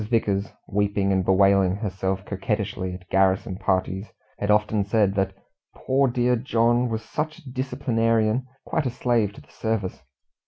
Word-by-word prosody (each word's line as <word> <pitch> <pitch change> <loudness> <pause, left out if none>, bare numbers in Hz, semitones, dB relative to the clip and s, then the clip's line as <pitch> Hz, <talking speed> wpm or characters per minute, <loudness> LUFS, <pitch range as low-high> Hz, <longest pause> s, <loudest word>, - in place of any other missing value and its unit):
Vickers 100 -4 +1 0.2
weeping 100 -1 +1
and 95 -1 +2
bewailing 95 0 +4
herself 95 -2 -3
coquettishly 100 -2 -2
at 90 0 -13
garrison 95 0 +2
parties 95 0 -1 0.3
had 105 - -2
often 105 0 +3
said 100 -1 +2
that 95 -1 0 0.4
"poor 135 +1 +2
dear 125 0 +2
John 120 0 +2
was 110 -1 -3
such 155 +6 -3
a 150 -6 -12
disciplinarian, 120 -2 0 0.2
quite 155 -5 0
a - - +1
slave 120 -4 +1
to - - -13
the - - -22
service." 110 -9 -2
105 Hz, 150 wpm, -24 LUFS, 95-120 Hz, 0.4 s, bewailing